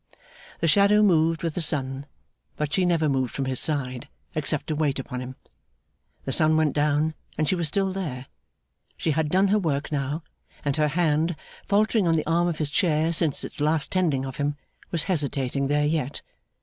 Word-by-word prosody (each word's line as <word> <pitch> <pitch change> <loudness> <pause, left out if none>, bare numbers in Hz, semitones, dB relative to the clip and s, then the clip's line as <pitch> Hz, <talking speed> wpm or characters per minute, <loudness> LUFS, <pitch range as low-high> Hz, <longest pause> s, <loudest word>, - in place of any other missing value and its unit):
The 165 - +2
shadow 200 +5 +5
moved 165 -4 +3
with 165 -2 -1
the 175 - -3
sun, 140 -2 0 0.5
but 150 -1 -3
she 185 -2 +2
never 165 -3 +2
moved 130 -3 -1
from 135 - -1
his 130 -1 +1
side, 140 -3 0 0.2
except 155 -2 -1
to 155 - -2
wait 150 -3 0
upon 125 -1 -5
him. 130 +1 -7 0.9
The 135 - -2
sun 155 +3 +3
went 155 -3 +2
down 150 +1 +1 0.2
and 155 0 0
she - - +2
was 170 -3 0
still 195 +4 0
there. 145 -10 -4 0.7
She 160 - 0
had 150 0 0
done 190 +4 +3
her 210 +2 +3
work 150 -6 -2
now, 145 +2 -2 0.4
and 140 -1 +1
her 150 -1 +3
hand, 160 +1 +1 0.3
faltering 210 -1 +2
on 165 - +3
the 155 - 0
arm 170 +2 +2
of 170 -3 -2
his 150 -2 -2
chair 160 +1 +1
since 155 -3 +1
its - - -6
last 150 -1 +1
tending 155 -8 +1
of 130 -1 -7
him, 145 0 -1 0.3
was 165 -3 0
hesitating 140 -6 -1
there 145 +1 +2
yet. 150 -2 -1
155 Hz, 190 wpm, -25 LUFS, 140-170 Hz, 0.9 s, shadow